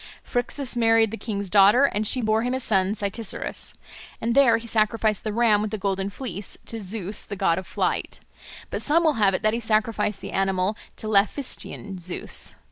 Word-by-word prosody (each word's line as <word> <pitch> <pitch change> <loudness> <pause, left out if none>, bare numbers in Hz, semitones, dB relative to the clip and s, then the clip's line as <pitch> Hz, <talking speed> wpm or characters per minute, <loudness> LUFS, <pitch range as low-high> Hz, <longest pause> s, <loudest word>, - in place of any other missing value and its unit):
Phrixus 245 +2 -2
married 225 -2 +3
the - - -4
king's 205 -3 -4
daughter, 205 +7 +6
and 215 -5 -1
she 255 +2 +3
bore 215 +1 +2
him 250 +2 -1
a - - -2
son 200 -4 +1
Cytisorus. 205 +1 -4 0.4
And 230 +1 -1
there 255 -4 +5
he 230 - -9
sacrificed 215 -1 +1
the 215 - -2
ram 215 -2 +3
with 215 - -2
the 215 - -4
golden 195 0 -2
fleece 205 -2 -6
to 225 -1 -3
Zeus 200 0 -2
the 200 - -6
God 190 -4 +1
of 190 - -10
Flight; - - -2 0.5
but - - -3
some 325 +3 +2
will 315 -2 +3
have 195 -2 +4
it - - -4
that 215 0 +2
he 230 - -1
sacrificed 215 -2 0
the - - -7
animal 195 +1 0 0.2
to 215 - -3
Laphystian 205 -2 -1
Zeus. 175 +1 -1
215 Hz, 195 wpm, -24 LUFS, 200-230 Hz, 0.5 s, daughter